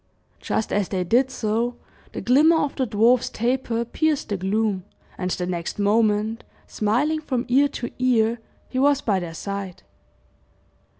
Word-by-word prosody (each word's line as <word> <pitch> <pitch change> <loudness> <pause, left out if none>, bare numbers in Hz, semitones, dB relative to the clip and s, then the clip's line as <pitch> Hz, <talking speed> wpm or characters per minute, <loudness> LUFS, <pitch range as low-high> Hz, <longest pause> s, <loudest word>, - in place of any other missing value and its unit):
Just 220 - -2
as 205 -2 0
they 185 -2 -1
did 245 +9 +2
so, 235 -1 -1 0.4
the - - -5
glimmer 300 +7 +5
of 290 -3 -1
the 260 - -1
dwarf's 230 +3 +3
taper 235 0 -1
pierced 305 +3 -1
the 205 - -1
gloom, 195 0 0 0.3
and 180 -1 -3
the 180 0 -2
next 175 -2 -4
moment, 210 +1 +1 0.2
smiling 275 +9 0
from 255 -5 -2
ear 275 +3 +4
to 240 -3 -6
ear, 235 -2 +2 0.3
he 255 - -3
was 280 +1 +4
by 200 -7 +1
their 170 -2 -6
side. 200 -1 -6
225 Hz, 155 wpm, -23 LUFS, 205-255 Hz, 0.4 s, glimmer